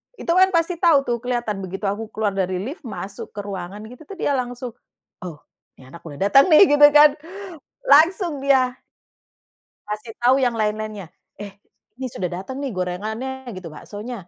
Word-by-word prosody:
Itu 335 Hz, -, -3 dB
kan 375 Hz, +1 st, +6 dB
pasti 335 Hz, +1 st, 0 dB
tahu 310 Hz, -6 st, +4 dB
tuh, 240 Hz, -3 st, -1 dB
kelihatan 240 Hz, -4 st, -3 dB
begitu 195 Hz, +1 st, -7 dB
aku 210 Hz, +2 st, -4 dB
keluar 215 Hz, -2 st, -1 dB
dari 185 Hz, -1 st, -2 dB
lift, 270 Hz, -, -7 dB
masuk 195 Hz, -1 st, -8 dB
ke 205 Hz, -, -4 dB
ruangan 195 Hz, 0 st, -7 dB
itu 250 Hz, +7 st, -12 dB
tuh 395 Hz, -, -9 dB
dia 345 Hz, -, -1 dB
langsung, 245 Hz, 0 st, -5 dB, 0.5 s
"Oh 165 Hz, -5 st, -9 dB, 0.3 s
ini 130 Hz, -1 st, -17 dB
anak 170 Hz, +2 st, -13 dB
boleh 145 Hz, -1 st, -9 dB
datang 270 Hz, -, +5 dB
nih." 310 Hz, -2 st, +6 dB
Gitu 290 Hz, -, +9 dB
kan, 295 Hz, 0 st, +6 dB, 0.7 s
langsung 320 Hz, +1 st, +4 dB
dia 265 Hz, -2 st, +3 dB, 1.2 s
Ngasih 215 Hz, +2 st, -6 dB
tahu 245 Hz, +2 st, +4 dB
yang 245 Hz, -2 st, +1 dB
lain-lainnya, 215 Hz, -2 st, -3 dB, 0.3 s
"Eh 205 Hz, -1 st, -8 dB, 0.4 s
ini 260 Hz, 0 st, -4 dB
sudah 180 Hz, -, -3 dB
datang 195 Hz, +10 st, -6 dB
nih 280 Hz, -2 st, -3 dB
gorengannya 220 Hz, +9 st, -4 dB
gitu, 180 Hz, -3 st, -9 dB
baksonya," 205 Hz, +4 st, -9 dB
225 Hz, 170 wpm, -21 LUFS, 195-275 Hz, 1.2 s, Gitu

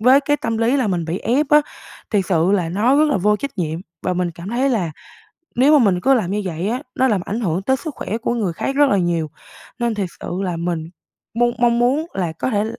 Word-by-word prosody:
với 255 Hz, +5 st, +6 dB
cái 290 Hz, +1 st, +1 dB
tâm 225 Hz, -5 st, -2 dB
lý 235 Hz, +4 st, +2 dB
là 255 Hz, -5 st, +1 dB
mình 175 Hz, -3 st, -1 dB
bị 170 Hz, +4 st, -3 dB
ép 265 Hz, +7 st, +1 dB
á, 300 Hz, 0 st, +7 dB, 0.5 s
thiệt 200 Hz, -4 st, +2 dB
sự 175 Hz, +2 st, +2 dB
là 180 Hz, -5 st, +1 dB
nó 225 Hz, +10 st, +2 dB
rất 305 Hz, -, +5 dB
là 285 Hz, -, +2 dB
vô 210 Hz, +3 st, +2 dB
trách 275 Hz, -3 st, -6 dB
nhiệm. 160 Hz, 0 st, -2 dB, 0.2 s
Và 185 Hz, -, 0 dB
mình 180 Hz, -1 st, -1 dB
cảm 170 Hz, +4 st, -9 dB
thấy 255 Hz, +4 st, +1 dB
là 185 Hz, -9 st, 0 dB, 0.6 s
nếu 285 Hz, +4 st, +5 dB
mà 240 Hz, -, +4 dB
mình 180 Hz, -3 st, +2 dB
cứ 270 Hz, +7 st, +4 dB
làm 200 Hz, -7 st, 0 dB
như 210 Hz, +1 st, -1 dB
vậy 180 Hz, +2 st, -3 dB
á, 250 Hz, +5 st, -2 dB
nó 260 Hz, +1 st, +2 dB
làm 205 Hz, -5 st, +1 dB
ảnh 220 Hz, +5 st, -3 dB
hưởng 180 Hz, -2 st, -1 dB
tới 265 Hz, +5 st, +2 dB
sức 310 Hz, 0 st, -7 dB
khỏe 220 Hz, -, -4 dB
của 235 Hz, +1 st, -1 dB
người 200 Hz, -7 st, -1 dB
khác 270 Hz, +11 st, -3 dB
rất 290 Hz, -1 st, +5 dB
là 200 Hz, -, +3 dB
nhiều, 170 Hz, -4 st, 0 dB, 0.5 s
nên 235 Hz, -1 st, 0 dB
thiệt 200 Hz, -4 st, -2 dB
sự -, -, -6 dB, 0.2 s
là 180 Hz, -3 st, -2 dB
mình 165 Hz, -1 st, -3 dB, 0.4 s
mong 240 Hz, +1 st, +3 dB
mong 235 Hz, -1 st, +3 dB
muốn 270 Hz, +7 st, +2 dB
là 175 Hz, -4 st, -1 dB
có 170 Hz, -, -3 dB
thể 210 Hz, -2 st, +1 dB
210 Hz, 260 wpm, -20 LUFS, 180-255 Hz, 0.6 s, á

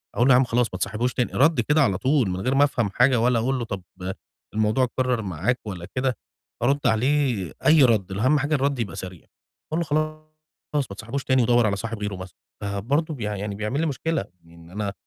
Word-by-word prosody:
أقول 120 Hz, -, +3 dB
لُه 135 Hz, -, +6 dB
يا -, -, +7 dB
عم -, -, +4 dB
خلاص 120 Hz, 0 st, +1 dB
ما 95 Hz, -, -4 dB
تصاحبوش 110 Hz, +6 st, -1 dB
تاني، 125 Hz, -, -1 dB
ردي 145 Hz, -3 st, +3 dB
كده 150 Hz, +5 st, +3 dB
على 100 Hz, -9 st, +2 dB
طول 130 Hz, -2 st, +2 dB
من 90 Hz, +1 st, -3 dB
غير 130 Hz, +6 st, 0 dB
ما 140 Hz, -, +5 dB
أفهم 120 Hz, -7 st, +1 dB
حاجة، 125 Hz, +3 st, +4 dB
ولا 120 Hz, 0 st, +3 dB
أقول 130 Hz, +3 st, 0 dB
له 120 Hz, -, -3 dB
طب 100 Hz, -4 st, -5 dB, 0.7 s
الموضوع 110 Hz, +4 st, +2 dB
أتكرر 125 Hz, -1 st, 0 dB
معاك 100 Hz, +6 st, -1 dB
والّا 90 Hz, -3 st, -6 dB
كده، 130 Hz, -3 st, 0 dB, 0.5 s
أرُد 140 Hz, +1 st, +2 dB
عليه 120 Hz, -, +1 dB
أي 155 Hz, -2 st, +7 dB
رد 110 Hz, -7 st, +2 dB
أهم 130 Hz, +10 st, +2 dB
حاجة 145 Hz, +2 st, 0 dB
الرد 140 Hz, -2 st, 0 dB
يبقى 100 Hz, -3 st, -3 dB
سريع، 90 Hz, -3 st, -8 dB, 0.4 s
أقول 160 Hz, -, 0 dB
له -, -, +1 dB
خلاص 155 Hz, 0 st, -2 dB, 0.7 s
ما 100 Hz, -, -6 dB
تصاحبوش 120 Hz, +6 st, -5 dB
تاني 130 Hz, -1 st, +3 dB
ودوَّر 120 Hz, 0 st, +4 dB
على 100 Hz, -, 0 dB
صاحب 115 Hz, +2 st, -5 dB
غيره 105 Hz, -1 st, -3 dB
مثلًا، 90 Hz, -3 st, -9 dB, 0.3 s
فبرضه 115 Hz, +11 st, -1 dB
بي 125 Hz, -7 st, -6 dB
يعني 105 Hz, -1 st, -3 dB
بيعمل 105 Hz, +8 st, -2 dB
لي 165 Hz, -, +1 dB
مشكلة، 160 Hz, -3 st, -1 dB, 0.2 s
إن 85 Hz, 0 st, -16 dB
أنا 100 Hz, 0 st, -3 dB
120 Hz, 215 wpm, -24 LUFS, 100-135 Hz, 0.7 s, يا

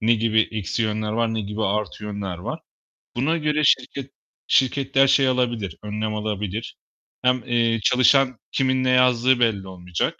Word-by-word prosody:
ne 115 Hz, +1 st, +3 dB
gibi 110 Hz, 0 st, +2 dB
eksi 110 Hz, +1 st, -3 dB
yönler 110 Hz, -1 st, -2 dB
var, 115 Hz, 0 st, 0 dB
ne 110 Hz, -, -1 dB
gibi 105 Hz, +1 st, -4 dB
artı 105 Hz, +1 st, -2 dB
yönler 100 Hz, -4 st, -5 dB
var, -, -, -6 dB, 0.6 s
buna 150 Hz, +7 st, 0 dB
göre 150 Hz, -1 st, 0 dB
şirket 135 Hz, -1 st, +1 dB, 0.4 s
şirketler 135 Hz, +1 st, +2 dB
şey 135 Hz, 0 st, +4 dB
alabilir, 120 Hz, -8 st, -1 dB
önlem 105 Hz, +1 st, -3 dB
alabilir. 105 Hz, 0 st, -4 dB, 0.5 s
Hem, 125 Hz, -1 st, +1 dB
eee, 115 Hz, -2 st, +1 dB
çalışan 130 Hz, +1 st, +4 dB
kimin 130 Hz, -1 st, +1 dB
ne 130 Hz, -, +1 dB
yazdığı 125 Hz, 0 st, +3 dB
belli 105 Hz, -5 st, 0 dB
olmayacak 90 Hz, -2 st, -4 dB
115 Hz, 155 wpm, -22 LUFS, 105-130 Hz, 0.6 s, şey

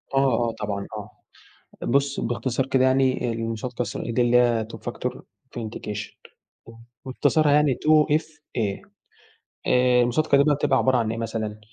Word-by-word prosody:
آه، 125 Hz, -4 st, +2 dB
آه، -, -, -3 dB
طبعًا، 100 Hz, -1 st, -3 dB
آه، 105 Hz, 0 st, -8 dB, 0.7 s
بُص 140 Hz, 0 st, +1 dB
باختصار 125 Hz, +2 st, -1 dB
كده، 130 Hz, -1 st, +2 dB
يعني 130 Hz, -2 st, +2 dB
المصادقة 115 Hz, +2 st, -3 dB
الثنائية 120 Hz, -1 st, -4 dB
ده 125 Hz, -, +2 dB
اللي 120 Hz, 0 st, +3 dB
هي 120 Hz, -2 st, +3 dB
two -, -, -8 dB
factor -, -, -5 dB
Authentication 105 Hz, -2 st, -8 dB, 0.9 s
وإختصارها 145 Hz, +3 st, +2 dB
يعني 145 Hz, -2 st, +4 dB
two 155 Hz, +1 st, +3 dB
FA 155 Hz, -7 st, -7 dB, 1.1 s
آآ 125 Hz, 0 st, +4 dB
المصادقة 140 Hz, +4 st, +2 dB
دي 140 Hz, -, +5 dB
بتبقى 135 Hz, -1 st, +1 dB
عبارة 130 Hz, -1 st, +3 dB
عن 115 Hz, -2 st, 0 dB
إيه 115 Hz, -, -4 dB
مثلًا، 110 Hz, -2 st, -4 dB
125 Hz, 145 wpm, -24 LUFS, 115-135 Hz, 1.1 s, دي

